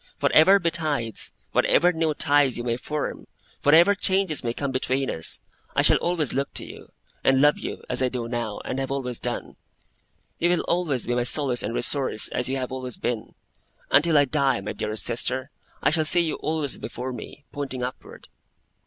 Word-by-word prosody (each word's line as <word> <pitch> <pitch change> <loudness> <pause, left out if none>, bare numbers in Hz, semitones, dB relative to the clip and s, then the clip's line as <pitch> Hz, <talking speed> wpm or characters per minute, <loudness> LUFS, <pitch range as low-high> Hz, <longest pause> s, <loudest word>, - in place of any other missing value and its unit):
Whatever 190 +6 +6
betides, 155 - -2 0.2
whatever 180 +1 +3
new 160 -2 0
ties 145 -3 +3
you 120 - -4
may 120 -1 -1
form, 150 +4 -5 0.3
whatever 165 +7 +6
changes 190 -6 +1
may 120 - -1
come 140 +3 -3
between 130 +1 -1
us, 80 - -1 0.4
I - - +3
shall - - +6
always 170 -5 -1
look 140 +1 -2
to - - -3
you, - - -12 0.3
and 135 0 +4
love 145 +2 +4
you, - - -6
as 125 +1 +1
I 130 - +2
do 120 -2 -4
now, 115 -3 -4
and 130 - -3
have 135 - -3
always 130 -3 -2
done. - - -5 0.8
You 175 - +2
will 175 - +2
always 160 -8 -1
be 120 - -1
my 120 - +1
solace 125 0 +2
and 115 - -3
resource, 130 -3 +1
as 125 +1 -1
you 135 - -1
have 130 -1 -4
always 130 -2 -6
been. 120 -3 -4 0.6
Until 155 +2 +4
I 145 - +5
die, 140 -4 +1
my 100 - -5
dearest 110 0 -1
sister, 130 +3 0 0.3
I - - +4
shall 160 0 +1
see 175 +3 +6
you 160 -2 -2
always 155 -3 -2
before 125 +1 -5
me, 140 +3 -10
pointing 135 -3 -5
upward! 125 +1 -8
135 Hz, 190 wpm, -24 LUFS, 125-155 Hz, 0.8 s, Whatever